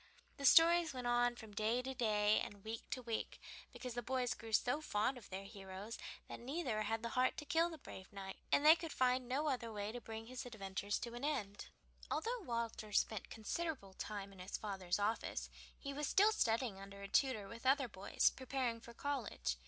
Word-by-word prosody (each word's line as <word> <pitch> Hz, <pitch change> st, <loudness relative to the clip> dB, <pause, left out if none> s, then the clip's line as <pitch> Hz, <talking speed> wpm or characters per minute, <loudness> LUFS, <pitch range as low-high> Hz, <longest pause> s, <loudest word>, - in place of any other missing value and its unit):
The 280 Hz, -, -3 dB
stories 335 Hz, -1 st, +7 dB
went 250 Hz, -1 st, -4 dB
on 240 Hz, 0 st, +3 dB
from 220 Hz, -3 st, -10 dB
day 220 Hz, +4 st, +1 dB
to 265 Hz, +1 st, -3 dB
day, 215 Hz, -3 st, +3 dB
and 200 Hz, -1 st, -6 dB
week 220 Hz, +1 st, -5 dB
to 255 Hz, -, -3 dB
week, 230 Hz, -2 st, -3 dB, 0.3 s
because 250 Hz, -2 st, -6 dB
the 240 Hz, -, -2 dB
boys 250 Hz, 0 st, 0 dB
grew 225 Hz, -1 st, -9 dB
so 250 Hz, +7 st, +3 dB
fond 220 Hz, -2 st, +1 dB
of 245 Hz, -5 st, -11 dB
their 190 Hz, +1 st, -4 dB
heroes 195 Hz, +2 st, -7 dB, 0.3 s
that -, -, -7 dB
neither 255 Hz, -4 st, -1 dB
had 225 Hz, +2 st, -1 dB
the 235 Hz, -, -1 dB
heart 255 Hz, +2 st, +2 dB
to 295 Hz, -, -5 dB
kill 330 Hz, +3 st, +3 dB
the 325 Hz, -, -7 dB
brave 190 Hz, -9 st, -10 dB
knight, 195 Hz, -1 st, -6 dB
and 285 Hz, -, +4 dB
they 315 Hz, +1 st, +11 dB
could 330 Hz, -2 st, -5 dB
find 255 Hz, -1 st, +2 dB
no 280 Hz, +4 st, +1 dB
other 245 Hz, -5 st, -1 dB
way 205 Hz, 0 st, -3 dB
to 245 Hz, +1 st, -6 dB
bring 225 Hz, 0 st, -6 dB
his 250 Hz, +2 st, -5 dB
adventures 205 Hz, -3 st, -2 dB
to 235 Hz, -1 st, -4 dB
an 240 Hz, +2 st, -6 dB
end. 230 Hz, -10 st, -2 dB, 0.4 s
Although 480 Hz, +2 st, 0 dB
Walter 230 Hz, -, -3 dB
spent 205 Hz, 0 st, +1 dB
considerable 225 Hz, -, -3 dB
time 200 Hz, 0 st, -5 dB
in 190 Hz, -, -15 dB
his 185 Hz, +2 st, -4 dB
father's 190 Hz, -4 st, -1 dB
office, 210 Hz, +2 st, -1 dB, 0.3 s
he 280 Hz, -1 st, -5 dB
was 295 Hz, +1 st, -1 dB
still 415 Hz, +3 st, +6 dB
studying 230 Hz, -, +1 dB
under 200 Hz, 0 st, -9 dB
a -, -, -4 dB
tutor 220 Hz, -3 st, +2 dB
with 230 Hz, +5 st, -6 dB
other 270 Hz, 0 st, +4 dB
boys, 200 Hz, -2 st, +2 dB
preparing 260 Hz, -3 st, -1 dB
for 235 Hz, 0 st, -11 dB
college. 255 Hz, -, -1 dB
235 Hz, 205 wpm, -38 LUFS, 205-265 Hz, 0.4 s, they